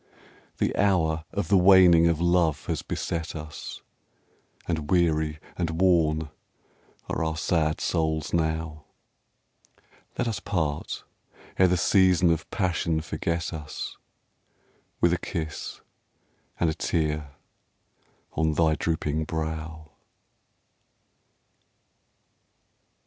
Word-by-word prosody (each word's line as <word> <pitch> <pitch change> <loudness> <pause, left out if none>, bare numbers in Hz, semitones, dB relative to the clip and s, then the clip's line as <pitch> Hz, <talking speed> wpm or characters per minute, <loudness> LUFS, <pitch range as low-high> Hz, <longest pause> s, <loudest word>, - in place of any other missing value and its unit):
The - - 0
hour 80 -5 +2
of 100 - -2
the 100 -2 +5
waning 90 -3 +7
of 85 -2 +1
love 85 -3 +2
has 80 -4 -2
beset 85 0 -4
us, 75 -1 -8 0.8
And 80 -4 -2
weary 80 -4 +2 0.2
and 85 -2 -2
worn 80 -5 +2 0.8
are - - -2
our 80 0 -2
sad 80 -2 +1
souls 80 -3 -1
now; 80 -2 -1 1.3
Let 120 - 0
us 115 - -2
part, 80 -8 -2 0.6
ere 95 - +7
the 90 0 +2
season 90 -1 +4
of 80 -1 -2
passion 85 -5 0
forget 85 +2 -3
us, 75 -2 -6 1.1
With 85 0 +4
a 90 - 0
kiss 80 -5 -5 0.8
and 85 - +2
a 80 - +1
tear 75 -3 -2 1.0
on 80 0 +1
thy 80 0 +3
drooping 80 -1 -1
brow. 80 -1 -5
80 Hz, 100 wpm, -26 LUFS, 80-85 Hz, 1.3 s, waning